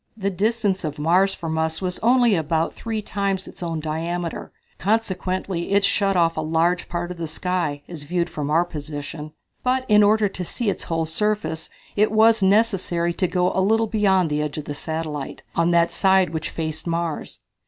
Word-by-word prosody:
The 200 -1 -1
distance 205 -1 0
of 150 -2 -3
Mars 180 +6 +3
from 160 -2 -3
us 160 0 0
was 180 -1 -3
only 240 -1 +4
about 160 -1 0
three 220 -2 -4
times 195 -2 -2
its - - -12
own 165 -2 -2
diameter, 165 +2 -3 0.3
consequently 185 -3 -1
it 200 0 +4
shut 195 -1 +1
off 165 -2 +3
a 160 - -1
large 165 +3 +1
part 175 0 -3
of 180 - -7
the 165 -1 -4
sky, 160 -3 -2
as 170 -4 -8
viewed 170 +4 -1
from 150 -1 -4
our 165 +3 +3
position. 150 -1 -6 0.3
But 255 +1 +1
in 210 -1 +6
order 210 +1 +4
to 185 -2 -5
see 210 +4 -1
its - - -7
whole 165 -1 -1
surface 205 -1 -1 0.3
it 210 +1 +3
was 220 0 +5
necessary 190 -4 +2
to 185 - 0
go 180 0 +1
a 190 - +1
little 225 +4 +3
beyond 195 -6 +2
the 150 0 +1
edge 150 0 -3
of 150 - -5
the 145 - -4
satellite, 155 -1 -5
on 170 0 +2
that 170 -1 +3
side 190 -2 +3
which 160 -1 -3
faced 160 0 -4
Mars. 170 -2 -3
175 Hz, 190 wpm, -23 LUFS, 160-200 Hz, 0.3 s, in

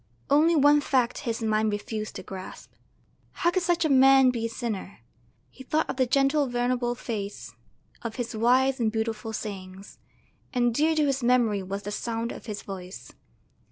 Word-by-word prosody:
Only 315 +4 +5
one 295 0 +5
fact 250 -4 +1
his 230 0 -3
mind 215 0 +1
refused 215 +1 -4
to - - -7
grasp: 190 -1 -9 0.6
how 345 - +1
could 370 - 0
such 345 -1 +1
a - - +4
man 270 -1 +6
be 230 -2 -2
a - - -9
sinner? 220 - -5 0.5
He 265 - -12
thought 310 +4 0
of - - -4
the 260 -2 +2
gentle, 275 +3 +2
venerable 245 0 -1
face, 210 -4 -6 0.5
of 230 -2 -5
his 240 -2 -4
wise 255 +4 +3
and 225 -2 +1
beautiful 220 0 -3
sayings; 195 -3 -7 0.6
and 240 -1 +2
dear 315 +5 +2
to 305 -1 +2
his 275 -1 0
memory 235 -4 +2
was 195 +2 -5
the 205 - -5
sound 230 +2 -3
of - - -10
his 210 -2 -5
voice. 185 -1 -9
240 Hz, 175 wpm, -26 LUFS, 215-270 Hz, 0.6 s, man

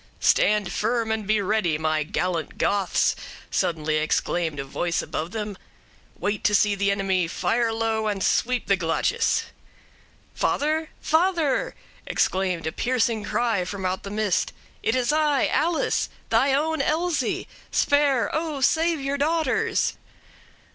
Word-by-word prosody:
"'Stand 210 -3 +3
firm 230 -2 0
and 220 -2 -2
be 215 0 +3
ready, 190 -6 +1
my 155 0 0
gallant 165 +2 -2
60ths!' 200 -2 +2 0.4
suddenly 155 -2 0
exclaimed 155 0 0
a - - -2
voice 170 +5 -2
above 160 +2 -4
them; 210 0 -4 0.6
wait 205 0 -2
to 205 +2 +3
see 205 0 +3
the 200 0 0
enemy; 195 -3 +1
fire 230 +6 0
low, 225 -1 -1
and 200 -2 -1
sweep 250 0 +1
the 195 - +3
glacis.' 165 -3 +1 0.9
"'Father? 310 +2 0
father!' 325 -3 +1 0.3
exclaimed 185 -3 0
a 160 - -1
piercing 230 0 0
cry 220 -3 0
from 190 +1 -5
out 185 +1 -1
the 200 - -7
mist; 210 -2 0 0.3
'it 225 - +1
is 255 +2 +1
I! 300 -3 +2
Alice! 330 +2 +1 0.2
thy 275 - +4
own 315 +4 +1
Elsie! 330 +2 0 0.2
spare, 285 -4 +2
O! 315 -2 -2
save 325 +4 +2
your 275 +1 -2
daughters!' 315 -1 +1
215 Hz, 135 wpm, -24 LUFS, 185-280 Hz, 0.9 s, thy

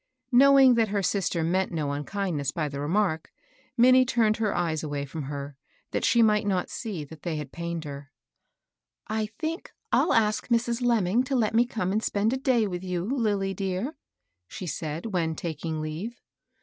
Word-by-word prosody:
Knowing 270 0 +7
that 230 -2 +3
her 200 -1 -1
sister 180 -3 0
meant 185 +3 0
no 155 -4 -2
unkindness 145 -1 -2
by 155 +1 -2
the 140 -1 -6
remark, 160 +1 0 0.5
Mmnie 255 +2 +7
turned 225 -4 +2
her 215 -2 0
eyes 165 -3 -1
away 145 -2 -3
fix)m 145 +1 -6
her, 140 0 -6 0.4
that - - -1
she 235 -1 +4
might 210 -1 +3
not 185 -3 0
see 205 -10 -4
that 150 +1 -12
they 170 -3 -3
had 150 -3 -5
pained 170 -1 -4
her. 140 -2 -8 0.5
" - - -62 0.2
I 215 0 -1
think 325 +2 -4 0.2
I'll - - +3
ask 215 -1 +2
Mrs. 235 0 +1
Lemming 230 -2 +2
to 270 - -1
let 220 -4 +1
me 235 +2 +4
come 215 -6 -2
and 215 +2 +1
spend 215 +2 0
a - - 0
day 255 -4 +2
with 180 -2 -4
you, 180 -1 -2
Lilly 210 -6 0
dear," 195 - -2 0.5
she 185 - -7
said, 155 +1 -4
when 165 -3 0
taking 160 -1 -4
leave. 165 +10 -5
190 Hz, 185 wpm, -27 LUFS, 160-225 Hz, 0.5 s, Knowing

